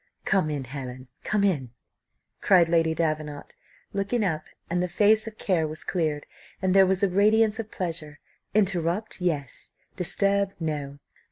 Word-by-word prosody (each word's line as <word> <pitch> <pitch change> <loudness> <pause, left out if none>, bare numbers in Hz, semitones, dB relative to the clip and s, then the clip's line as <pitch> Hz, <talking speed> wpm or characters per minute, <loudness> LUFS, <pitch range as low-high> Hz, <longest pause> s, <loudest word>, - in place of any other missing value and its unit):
"Come 190 -6 +2
in, 145 -3 -3
Helen, 130 -1 -7
come 210 -2 +1
in," 135 -11 0 0.7
cried 180 -3 +5
Lady 165 -1 +2
Davenant, 155 -3 -3 0.4
looking 200 +4 0
up, 155 -4 -1 0.2
and 175 +1 0
the 180 - 0
face 215 +5 +3
of 220 -1 -8
care 170 -5 +1
was 155 +1 -6
cleared, 155 -5 -1 0.3
and 190 -1 +1
there 195 -1 +6
was 190 +1 +1
a - - +5
radiance 215 +3 +3
of 220 -1 -4
pleasure 160 -6 -5 0.4
"Interrupt 190 0 0
yes: 150 -7 -2 0.3
disturb 200 +2 +1
no. 145 -4 -3
175 Hz, 150 wpm, -26 LUFS, 155-200 Hz, 0.7 s, there